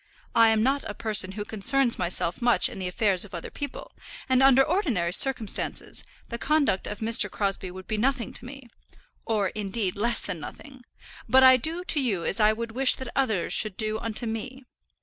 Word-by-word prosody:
I 230 -1 +5
am 220 -1 +2
not 275 +3 +1
a 205 - -6
person 200 -4 +1
who 205 0 -5
concerns 240 +4 0
myself 175 +1 -1
much 240 0 +3
in - - -9
the 185 - -3
affairs 185 0 +1
of 200 -3 -8
other 170 - -7
people; 285 - -7 0.4
and 260 0 +3
under 270 0 +6
ordinary 265 - -1
circumstances, 230 -2 0 0.3
the 235 - -5
conduct 290 -11 +1
of 210 - -7
Mr. 220 -2 +3
Crosbie 195 -1 -2
would 185 +1 -10
be 215 - -3
nothing 245 -1 -1
to - - -4
me, 270 0 -11 0.6
or, 210 -4 0
indeed, 200 -2 -3
less 230 +3 +1
than 190 -5 -4
nothing; 260 - -11 0.5
but 265 0 +6
I 260 0 +8
do 320 +8 -2
to 310 -5 0
you 200 -10 -1
as - - -1
I 215 0 +5
would 230 +1 -5
wish 260 +3 +4
that 260 -2 -7
others 220 -10 0
should 215 -4 +1
do 215 0 -2
unto 230 +1 -4
me. 250 +4 -6
225 Hz, 195 wpm, -26 LUFS, 200-260 Hz, 0.6 s, I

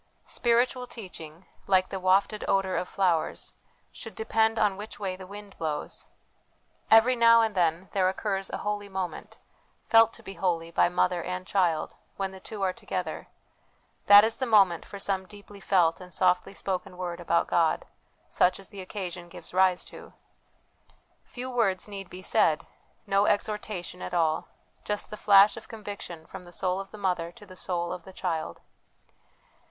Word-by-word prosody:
Spiritual 245 +1 +1
teaching, 175 -7 -10 0.2
like 185 -1 +3
the 195 - -4
wafted 195 +3 +2
odour 195 -1 +1
of 180 - -2
flowers, 180 -5 0 0.4
should 225 -4 -10
depend 225 0 +1
on 210 -3 +2
which 210 +2 -9
way 190 -3 -2
the 185 0 -11
wind 205 0 -10
blows. 155 -2 -4 0.8
Every 225 +3 +6
now 230 -1 +6
and 220 -1 0
then 175 0 +1
there 185 -2 +3
occurs 195 0 -2
a - - -3
holy 205 -1 -2
moment, 190 -2 -5 0.5
felt 225 -1 +6
to 230 - -12
be 195 - -7
holy 170 -4 -1
by 170 - +3
mother 180 0 +1
and 180 +1 -4
child, 175 -6 +1 0.2
when 195 -1 -2
the 190 - -11
two 200 +1 -6
are 185 -1 +1
together - - -5 0.8
that 205 0 +10
is 225 +1 0
the 260 - -2
moment 195 -7 +4
for 200 - -8
some 195 -1 -2
deeply 205 0 -13
felt 180 -3 +2
and 180 0 -11
softly 180 +2 +1
spoken 185 -2 -4
word 175 -1 -4
about 170 -1 +1
God, 165 -2 +1 0.4
such 180 - +2
as 195 - -12
the 200 -2 -8
occasion 180 -3 -6
gives - - -12
rise 185 -1 +3
to. - - -12 1.1
Few 250 +1 -7
words 225 -8 0
need 195 -2 -8
be 185 +1 -9
said, 155 -4 +2 0.4
no 200 +1 +2
exhortation 205 -3 -2
at 180 - -4
all; 160 -2 +1 0.4
just 210 0 -3
the - - -4
flash 205 0 +6
of - - -10
conviction 200 -7 -8
from 190 +3 -9
the 175 - -13
soul 185 +1 -1
of 195 0 -7
the 215 - -11
mother 180 -4 -1
to 220 -3 -14
the 185 -2 -13
soul 175 -2 -2
of 180 - -7
the 190 - -12
child. 165 -5 -3
190 Hz, 170 wpm, -27 LUFS, 180-210 Hz, 1.1 s, that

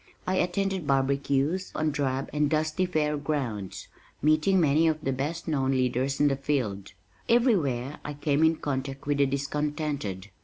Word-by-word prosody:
I 185 0 0
attended 185 -2 0
barbecues 140 +5 +1
on 155 0 +1
drab 135 -2 -2
and 150 -1 +2
dusty 155 +4 0
fair 150 -3 0
grounds, 130 -10 -3 0.3
meeting 155 +6 +3
many 155 0 +4
of 155 -1 +1
the 135 - 0
best 150 +7 -3
known 135 -4 +1
leaders 130 +1 0
in 145 - +5
the 140 - +2
field. 120 -9 -2 0.4
Everywhere 150 - +2
I 150 - -5
came 145 +1 +1
in 160 0 +4
contact 135 -2 -4
with 145 0 0
the 140 - +4
discontented. 140 - -3
145 Hz, 155 wpm, -27 LUFS, 135-155 Hz, 0.4 s, in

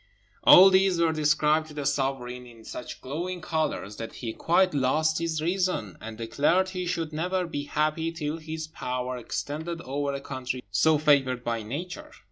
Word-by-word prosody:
All 190 +1 +9
these 190 -2 +3
were 165 -1 +3
described 150 0 +2
to 155 - -11
the 145 -2 -4
sovereign 135 -3 -2
in 115 -2 -15
such 125 - -8
glowing 175 +7 -4
colours 155 - -2
that 115 - -6
he 115 -3 -5
quite 180 +6 +2
lost 155 +4 +2
his 160 -2 -2
reason, 180 - -1
and 110 0 -7
declared 145 +11 +1
he 180 -1 -4
should 165 -3 -2
never 180 +4 -1
be 145 -4 -4
happy 155 +2 0
till 155 -1 -3
his 160 0 -5
power 125 -4 -4
extended 155 +7 -4
over 140 +1 -2
a 140 - -3
country 130 -2 -5
so 155 +10 +4
favoured 135 -5 +2
by 115 -1 -2
Nature. 180 - -6
150 Hz, 170 wpm, -27 LUFS, 130-165 Hz, -, All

